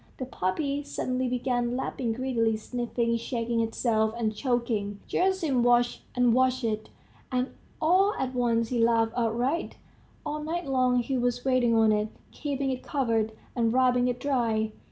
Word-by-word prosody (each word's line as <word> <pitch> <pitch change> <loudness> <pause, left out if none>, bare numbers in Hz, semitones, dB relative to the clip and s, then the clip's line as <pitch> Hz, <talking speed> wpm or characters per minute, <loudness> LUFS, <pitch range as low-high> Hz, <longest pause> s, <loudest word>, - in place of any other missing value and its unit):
The 260 - -4
pup 185 -7 -2 0.3
suddenly 255 -2 -2
began 245 -1 -1
lapping 245 -3 -2
greedily, 230 -3 0
sniffing, 235 0 -1
shaking 230 0 -2
itself, 225 -1 0
and 220 -2 0
choking. 230 -5 -1
Gerasim 355 -9 +1
watched 240 0 +3
and 245 -2 +4
watched 255 0 +2
it, 220 -1 -2 0.4
and 255 +1 0 0.3
all 375 +6 +3
at 260 -1 -2
once 230 -2 +1
he 245 - -1
laughed 230 -1 +3
outright.... 245 +7 0 0.5
All 300 0 -3
night 340 +3 -3
long 255 -2 +2
he 260 +1 -1
was 245 0 -1
waiting 255 -3 +3
on 220 -1 +5
it, 210 0 +1 0.2
keeping 275 -2 -2
it 255 - -4
covered, 225 -5 0 0.2
and 230 -2 +2
rubbing 250 -1 +3
it 245 0 -1
dry. 230 -5 0
245 Hz, 155 wpm, -27 LUFS, 230-260 Hz, 0.5 s, on